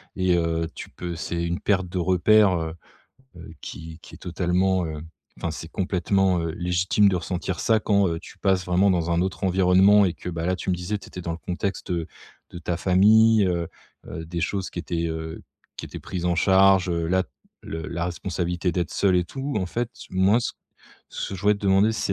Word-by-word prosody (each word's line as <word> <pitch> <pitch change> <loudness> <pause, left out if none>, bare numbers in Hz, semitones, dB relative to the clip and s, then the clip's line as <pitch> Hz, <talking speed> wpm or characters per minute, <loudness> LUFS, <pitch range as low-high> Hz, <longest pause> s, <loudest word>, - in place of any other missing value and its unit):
Et 95 -1 +2
heu, 85 -1 0
tu - - -9
peux, 85 -1 -6
c'est 85 +1 -3
une 85 +2 -2
perte 95 -3 0
de 90 - -4
repères 95 +2 +4
heu, 80 0 -4 0.6
heu, 85 - -11
qui 80 +1 -9
qui - - -13
est - - -12
totalement 90 +1 0
heu, 75 -1 -6 0.4
enfin 85 - -3
c'est 80 +1 -7
complètement 95 0 +1
heu, 85 - -2
légitime 90 +3 +2
de 95 - +2
ressentir 90 +1 -4
ça 110 -1 +3
quand 100 -2 +2
heu, 80 -1 -2
tu - - -14
passes 95 -2 +1
vraiment 90 +3 +3
dans 85 -2 +1
un 85 +1 +2
autre 95 +1 -3
environnement 95 +2 +5
et 90 - 0
que 90 - -7
bah, 85 0 -3
là 90 - +1
tu 95 - -3
me - - +1
disais, 90 +4 -3
tu 100 - -13
étais 90 - -8
dans 85 - -4
le 80 - -6
contexte, 90 +2 -4
heu, 85 -2 -2 0.4
de 85 - -9
ta 85 0 -3
famille 105 +4 +5
heu, 85 -2 -1 0.4
heu, 80 - -6
des 85 +1 -4
choses 95 +2 -2
qui 85 - -5
étaient 85 -1 -2
heu, 80 0 -5 0.3
qui - - -6
étaient - - -8
prises 90 -2 -5
en 90 - +2
charge 95 +1 +4
heu, 85 -1 -1
là, 95 +2 +2 0.4
le 80 0 -6
la 85 0 -3
responsabilité 90 0 -2
d'être 85 -2 -1
seul 95 -2 +2
et 90 - +3
tout. 135 +8 -5
En 95 - -2
fait 120 +5 -3 0.2
moi 95 +5 +3
ce 120 - -3 0.6
ce - - -5
que - - -4
je 90 - -9
voudrais 105 +1 +4
te 100 - -10
demander, 100 +2 +3
c'est 100 - -1
90 Hz, 220 wpm, -24 LUFS, 85-95 Hz, 0.6 s, environnement